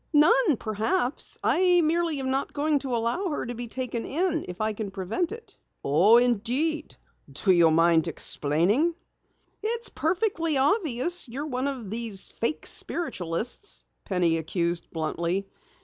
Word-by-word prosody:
"None, 320 - +5
perhaps. 235 - -1
I 360 -1 +4
merely 330 -1 +1
am 260 -1 -2
not 270 +1 -1
going 295 0 +1
to 265 -3 -3
allow 235 - -1
her 295 - -3
to 245 - -4
be 240 0 -6
taken 240 -1 -4
in 325 +1 -1
if 180 +1 -8
I 215 0 0
can 210 -1 -5
prevent 195 - -2
it!" 460 +1 -10 0.3
"Oh, 180 +11 +5
indeed. 250 +7 0 0.4
Do 195 - +1
you 170 -2 +5
mind 165 +1 +4
explaining?" 175 - +1 0.7
"It's 465 +2 0
perfectly 335 -3 0
obvious 300 - +1
that - - -13
you're 285 +4 -3
one 260 -2 -2
of 250 -8 -5
these 225 -4 -3
fake 230 +7 -2
spiritualists," 235 - -2 0.2
Penny 175 -4 +1
accused 170 +1 -2
bluntly. 170 +4 -2
245 Hz, 145 wpm, -26 LUFS, 195-320 Hz, 0.7 s, None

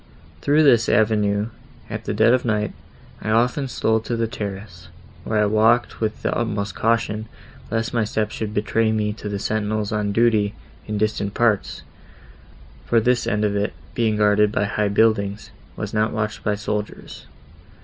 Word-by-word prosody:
Through 150 - +4
this 120 -6 +5
avenue, 105 -1 +2 0.4
at - - -6
the - - -2
dead 120 - +5
of 125 - +2
night, 105 -3 0 0.5
I - - -4
often 125 +5 +2
stole 110 -3 +1
to 115 +2 -3
the 115 0 0
terrace, 100 -5 -7 0.4
where 110 - -1
I 105 - +4
walked 110 +4 +2
with 110 -1 -2
the - - 0
utmost 110 -3 -2
caution, 110 -1 0 0.4
lest 115 +1 -2
my 115 -2 +2
steps 105 0 -2
should 110 -2 -4
betray 110 +1 +1
me 105 -1 0
to 105 -1 -7
the 100 - -2
sentinels 105 0 -1
on 105 -1 -1
duty 110 -1 +2 0.3
in 105 -1 -2
distant 105 -1 -1
parts; 100 - +1 1.0
for 115 - +3
this 120 +1 +1
end 105 0 +1
of 100 -1 0
it, 100 +1 -1 0.2
being 110 -3 +1
guarded 105 0 +4
by 105 - 0
high 105 0 0
buildings, 100 -1 +1 0.2
was - - -5
not 110 0 +1
watched 110 0 -3
by 105 - +1
soldiers. 105 0 -5
110 Hz, 170 wpm, -22 LUFS, 105-115 Hz, 1.0 s, this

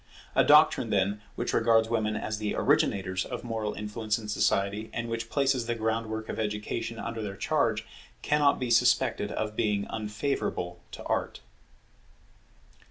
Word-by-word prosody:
A - - +5
doctrine, - - +5
then, 100 +2 +1
which - - -2
regards 115 -1 +4
women 110 -2 0
as 105 0 -3
the 105 -1 -2
originators 95 -1 +1
of - - -6
moral 110 -3 -3
influence 105 +1 -2
in 110 -2 -8
society, 105 +1 0
and 115 0 -3
which 115 0 -3
places 135 -4 +1
the 120 - 0
groundwork 110 -1 -2
of - - -5
education 110 +2 -3
under 115 -1 -4
their 100 -2 -4
charge, - - 0 0.4
cannot 145 -1 +3
be 125 -2 -2
suspected 120 -2 +3
of 105 0 -3
being 105 -3 0
unfavourable 105 -4 -2
to - - -7
Art. - - -2
110 Hz, 150 wpm, -28 LUFS, 105-115 Hz, 0.4 s, A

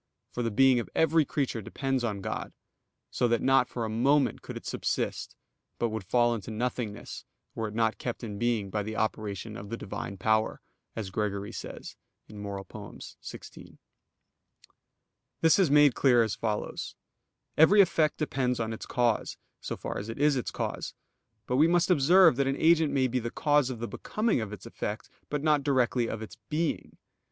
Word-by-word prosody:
For 120 - -3
the 115 - 0
being 130 +3 +4
of 115 - -5
every 160 -1 +4
creature 135 -6 -2
depends 135 +4 -2
on 105 -4 -2
God, - - -4 0.6
so 120 - +1
that 120 -1 +2
not 135 -1 +4
for 120 -2 -3
a - - -2
moment 135 +6 +2
could - - -7
it - - -10
subsist, - - -2 0.4
but 120 - 0
would 110 -2 -4
fall 120 +5 +2
into 110 -3 -5
nothingness 115 -1 -4 0.3
were 110 - -3
it 105 - -8
not 115 -1 +1
kept 120 0 -4
in 105 -3 -5
being 115 -5 0
by 105 - -1
the 110 +2 -5
operation 110 -1 -3
of 100 0 -8
the 115 - -4
Divine 100 -1 -6
power, 110 +2 +1 0.4
as 105 -4 -5
Gregory 100 0 -2
says - - -8 0.3
(Moral. 100 -2 -6
xvi). - - -11 1.6
This 165 +4 +5
is 185 -6 +4
made 145 -2 +6
clear 125 -3 +4
as 110 - -2
follows: 105 -2 -3 0.6
Every 185 +7 +6
effect 160 -5 +4
depends 130 -5 -1
on 115 -1 -2
its 110 - -8
cause, 120 -3 0 0.2
so - - -5
far - - -4
as 105 +3 -7
it 115 - -5
is 145 0 +3
its 125 - -2
cause. - - -4 0.5
But 125 - 0
we 155 +4 +6
must 175 +1 +3
observe 170 -1 +6
that 140 -1 +2
an 135 - 0
agent 160 -2 +4
may 135 -2 +2
be 125 +1 -1
the 120 0 -3
cause 145 0 +2
of 130 - -4
the 120 +1 -4
becoming 215 - -1
of 110 -2 -5
its 105 - -9
effect, 110 -2 -5 0.2
but 150 -1 -2
not 150 -2 +3
directly 125 -4 +1
of 110 0 -4
its 110 - -10
_being. 160 +1 -2
120 Hz, 180 wpm, -28 LUFS, 110-140 Hz, 1.6 s, made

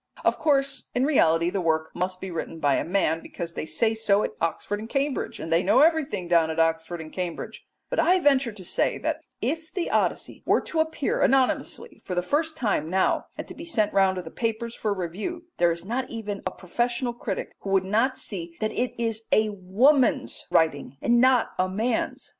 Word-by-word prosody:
Of - - +2
course 275 -3 +1
in 250 +2 +2
reality 170 - +3
the 195 0 -1
work 160 -1 0
must 185 +1 -2
be 190 -1 -6
written 165 -1 -5
by 145 -3 +3
a - - 0
man, 165 -3 +1
because 170 -1 -6
they 155 - -5
say 220 +9 +1
so 215 -2 +2
at - - -2
Oxford 165 +5 -1
and 220 +1 -8
Cambridge, 275 +1 -1
and 165 +1 -2
they 165 - +4
know 210 +8 +4
everything 300 - +2
down 170 -2 +4
in 160 +1 -3
Oxford 165 +1 +1
and 155 -1 -9
Cambridge; 180 -3 -5 0.2
but - - -2
I 370 +1 +4
venture 275 -6 +3
to 200 -3 -11
say - - 0
that 315 +1 -2 0.2
if 320 +6 -2
the 365 -3 -2
Odyssey - - 0
were - - +3
to 325 - -3
appear 315 -3 0
anonymously 265 -1 +1
for 180 - -4
the 180 - +1
first 310 - 0
time 200 - 0
now, 190 +1 +1
and - - -6
to - - -9
be - - -9
sent 220 -11 0
round 195 -1 +4
to 180 - -4
the 160 - -9
papers 230 0 -2
for 215 - -2
review, 200 - -4
there 175 -1 +4
is 170 +1 -4
not 250 +5 -2
even 210 -3 -5
a - - +1
professional 240 +7 -2
critic 240 - -4
who 195 - -6
would 195 -1 +2
not 230 +7 +1
see 170 -4 -6
that 215 - -1
it 250 0 -2
is 225 -1 -1
a 215 0 +4
woman's 225 +9 +2
writing 145 -4 +1
and 240 0 +3
not 255 -2 +4
a 185 0 +2
man's. 220 +5 -1
210 Hz, 210 wpm, -25 LUFS, 175-255 Hz, 0.2 s, they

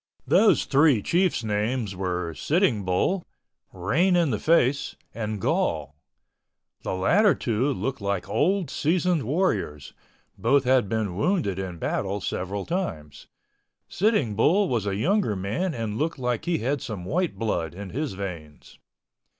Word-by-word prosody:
Those - - +4
three 140 -6 +4
chiefs' 175 -7 +1
names 105 0 -1
were 90 -3 -2
Sitting 145 - +1
Bull, 95 - 0 0.5
Rain 150 - +1
in 170 -5 +2
the 105 - -1
Face, 140 -3 +2 0.2
and 110 -2 -4
Gall—the 75 -1 -5
latter 200 - +4
two 120 +5 0
looked 135 -2 -3
like 100 -2 -2
old 190 -2 +1
seasoned 175 +1 +1
warriors, 130 - -1 0.5
both 140 -1 +3
had 125 -5 +3
been 110 -5 -1
wounded 105 - 0
in 95 -3 -5
battle 100 +4 -2
several 95 +1 -3
times. 80 - -4 0.6
Sitting 180 - +1
Bull 185 - +3
was 115 - -1
a 100 - -1
younger 175 - +1
man 110 - -2
and 110 -1 -3
looked 160 +2 -1
like 125 -3 -2
he 175 -1 +1
had 135 +4 -1
some 100 -6 -6
white 175 - -1
blood 85 -8 -2
in 100 -1 -7
his 145 0 -3
veins. 85 -6 -8
115 Hz, 140 wpm, -25 LUFS, 95-165 Hz, 0.6 s, Those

